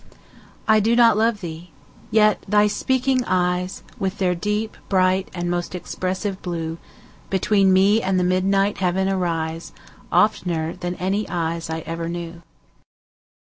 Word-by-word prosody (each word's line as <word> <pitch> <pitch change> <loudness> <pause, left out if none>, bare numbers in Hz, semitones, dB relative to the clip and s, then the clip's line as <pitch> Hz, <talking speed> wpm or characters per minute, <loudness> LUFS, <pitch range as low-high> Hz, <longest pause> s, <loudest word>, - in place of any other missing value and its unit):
I 220 0 +5
do 225 +3 +2
not 230 -2 +6
love 220 -1 +1
thee!—yet 175 +5 -1
thy 210 +1 +4
speaking 255 +4 +1
eyes, 180 0 -1 0.2
With 190 +1 -2
their 185 -2 +1
deep, 210 +4 -2
bright, 185 0 +2
and 175 -1 -4
most 175 +1 -2
expressive 185 +2 -3
blue, 165 -2 -4 0.5
Between 195 0 +3
me 200 +4 +4
and 190 -2 +1
the - - +1
midnight 195 +2 +1
heaven 190 +1 +1
arise, 165 -3 -2 0.3
15 - - -26
Oftener 175 -4 +1
than 180 0 -4
any 195 +4 -2
eyes 165 -1 -2
I 160 0 -3
ever 165 +1 -4
knew. 170 0 -6
185 Hz, 140 wpm, -22 LUFS, 175-205 Hz, 0.5 s, not